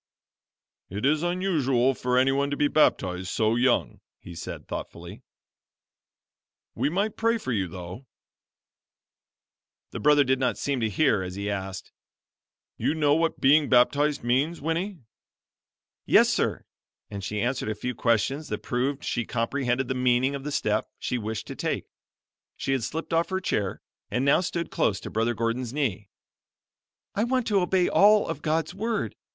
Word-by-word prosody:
"It 100 +6 -3
is 150 +2 +3
unusual 155 -8 +1
for 125 0 -1
anyone 135 +2 +2
to 145 - -3
be 145 - +3
baptized 95 -12 +1
so 110 +3 +1
young," 120 +1 +1 0.2
he 90 - -11
said, 85 - -7
thoughtfully, - - -7 1.5
"We - - 0
might 200 +6 -1
pray 230 +1 +1
for 130 - -5
you 100 -6 0
though." 90 +8 -9 1.8
The - - -5
brother 150 -1 +5
did 130 -1 +1
not 125 -2 0
seem 140 -2 -1
to 110 -2 0
hear 110 -2 +2
as 90 0 -5
he 100 +1 -3
asked, 95 -1 -5 0.9
"You 155 - 0
know 150 -2 +3
what 165 +1 +1
being 145 +2 +4
baptized 140 +4 +3
means, 135 +8 +1
Winnie?" 170 +6 -2 1.1
"Yes - - +6
sir"; - - -1 0.5
and 100 -1 -6
she 105 +2 -3
answered 120 -1 -1
a 110 - -2
few 125 +4 -4
questions 125 +6 0
that - - -5
proved 135 +3 -1
she 120 - -1
comprehended 125 +2 -1
the 130 - -1
meaning 125 +1 +2
of 140 -1 -5
the 150 - -4
step - - 0
she 125 - -2
wished 110 0 -4
to - - -7
take. - - -2 0.7
She - - -2
had 135 -2 +1
slipped 160 +6 -4
off 165 +1 +2
her 190 0 -1
chair, 100 - -2 0.3
and 125 +2 -1
now 140 +5 +4
stood 170 -2 -3
close 95 -3 +1
to - - -7
Brother 115 +2 0
Gordon's 115 +2 -2
knee. 110 -9 -2 1.0
"I 210 - 0
want 255 0 0
to 200 -2 +3
obey 180 0 +2
all 210 +1 +5
of 145 - -4
God's 160 +1 -1
Word. 210 - -2
135 Hz, 160 wpm, -26 LUFS, 115-155 Hz, 1.8 s, Yes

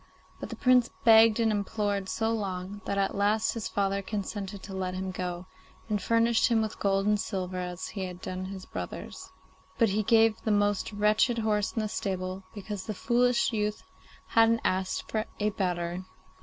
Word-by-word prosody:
But - - -6
the - - -5
Prince 250 -2 +4
begged 225 0 +7
and 225 -1 +3
implored 205 -1 -1
so 225 0 0
long, 200 -2 -3
that 200 - -2
at 195 0 +1
last 205 +2 +2
his 230 -2 -3
father 200 0 0
consented 200 -1 -5
to 195 - -8
let 185 -1 -3
him 190 0 -3
go, 180 -1 -4 0.4
and 210 -3 -1
furnished 230 +2 +3
him 230 -2 +3
with 220 -1 -3
gold 195 0 +1
and 210 0 +3
silver 185 -2 -3
as 180 0 -5
he 195 -3 -4
had 180 -1 -7
done 185 0 -5
his 190 0 -7
brothers. - - -7 0.5
But 230 -3 +4
he 205 +2 +1
gave 225 +1 +5
him - - -22
the 220 - 0
most 205 0 +1
wretched 210 +3 +2
horse 210 -2 0
in 225 - -1
his 215 - -3
stable, 185 -1 -3
because 205 -2 -6
the 215 - -3
foolish 245 +2 +2
youth 210 -1 -1 0.5
hadn't 230 0 +4
asked 185 0 0
for 215 0 0
a 210 0 +1
better. 180 -2 -2
205 Hz, 185 wpm, -28 LUFS, 190-220 Hz, 0.5 s, begged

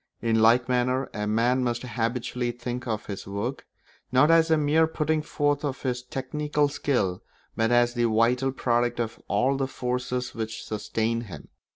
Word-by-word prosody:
In 110 -1 +1
like 115 +2 +5
manner 125 +1 0
a 105 -1 -3
man 120 +4 +2
must 120 0 -1
habitually 120 0 -2
think 120 +1 -5
of 110 -2 -2
his 100 -2 -6
work, 105 +7 -4 0.4
not 130 +5 +5
as 165 0 +5
a 160 - +4
mere 155 +2 +3
putting 155 -1 0
forth 145 -1 0
of 140 -2 -3
his 125 -2 -1
technical 145 +3 -1
skill, 105 -11 -1 0.3
but 115 0 +1
as 120 0 +4
the 120 -1 +1
vital 120 +4 +2
product 120 -2 0
of 115 -1 -3
all 135 +2 +2
the 135 -1 0
forces 125 -1 -3
which 110 -1 -5
sustain 110 +2 -1
him. 80 -9 -10
125 Hz, 170 wpm, -26 LUFS, 115-135 Hz, 0.4 s, like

